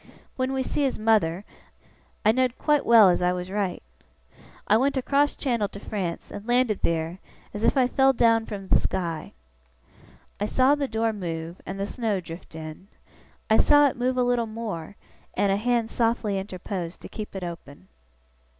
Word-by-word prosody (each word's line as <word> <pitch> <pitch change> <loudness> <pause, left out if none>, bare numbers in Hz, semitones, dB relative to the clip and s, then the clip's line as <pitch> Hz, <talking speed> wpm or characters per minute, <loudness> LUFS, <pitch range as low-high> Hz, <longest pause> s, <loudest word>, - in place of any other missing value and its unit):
When 260 0 -1
we 265 -1 -1
see 295 - -2
his 270 -2 0
mother, 210 -4 +2 0.8
I 215 - +7
know'd 255 +1 0
quite 295 -2 +1
well 230 -4 +8
as 175 - +2
I 180 0 +2
was 180 +1 -5
right. 200 -3 -2 0.8
I 210 - +4
went 270 +4 +2
across 280 +2 +2
channel 235 -7 0
to 200 - -10
France, 190 -5 -4
and 205 +2 -8
landed 240 -3 +2
theer, 165 +2 -1 0.3
as 210 - -5
if 275 - +3
I'd 255 -1 +3
fell 270 0 +4
down 230 -3 +3
from 195 -2 -6
the - - +5
sky.' 170 -4 -3 1.1
I 205 - 0
saw 260 +5 +4
the 290 -1 0
door 225 -1 0
move, 170 -3 -5
and 195 +1 -5
the 200 - -1
snow 215 -2 -2
drift 165 -1 -10
in. 155 +3 -8 0.6
I 220 - +4
saw 290 0 +6
it - - -7
move 250 +1 -1
a 250 - +3
little 245 -2 +1
more, 210 -6 -6 0.4
and 200 - +2
a 195 - +2
hand 235 +1 0
softly 225 -4 0
interpose 185 -2 -5
to - - -11
keep 215 -2 -8
it 190 - -4
open. 145 - -9
215 Hz, 180 wpm, -25 LUFS, 180-245 Hz, 1.1 s, well